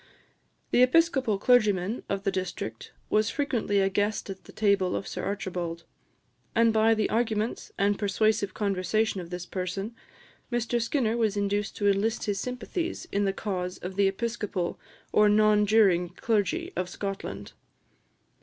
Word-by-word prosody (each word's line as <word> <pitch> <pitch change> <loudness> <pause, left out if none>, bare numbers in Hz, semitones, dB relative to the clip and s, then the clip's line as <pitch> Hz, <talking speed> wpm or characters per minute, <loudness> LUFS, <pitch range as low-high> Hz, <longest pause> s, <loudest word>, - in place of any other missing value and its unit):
The 245 - +4
Episcopal 260 -5 +3
clergyman 210 -2 +2
of 195 0 -2
the 195 - +1
district 180 - -5 0.2
was 215 0 +3
frequently 245 -8 0
a 195 - +3
guest 205 +1 -1
at 190 - -10
the - - -12
table 200 -4 +2
of - - -3
Sir - - -5
Archibald; 175 -4 -3 0.7
and 230 -1 +4
by 220 +1 +4
the 215 -1 +1
arguments 225 -1 -1
and 200 0 +1
persuasive 205 0 +1
conversation 200 +1 0
of 170 - -9
this 180 0 -5
person, 195 +5 -4 0.6
Mr 240 0 0
Skinner 230 -1 0
was 215 -3 +1
induced 205 0 -1
to 205 - +1
enlist 200 +3 +1
his 205 -2 -1
sympathies 290 - -4
in 200 0 +1
the 195 - +2
cause 185 -3 -3
of 185 +1 -7
the 200 0 +4
Episcopal 200 -3 -2 0.3
or 210 0 +5
non 210 0 +4
juring 195 -5 +4
clergy 230 - -1
of 180 - -2
Scotland. 195 +1 -5
205 Hz, 150 wpm, -27 LUFS, 195-225 Hz, 0.7 s, or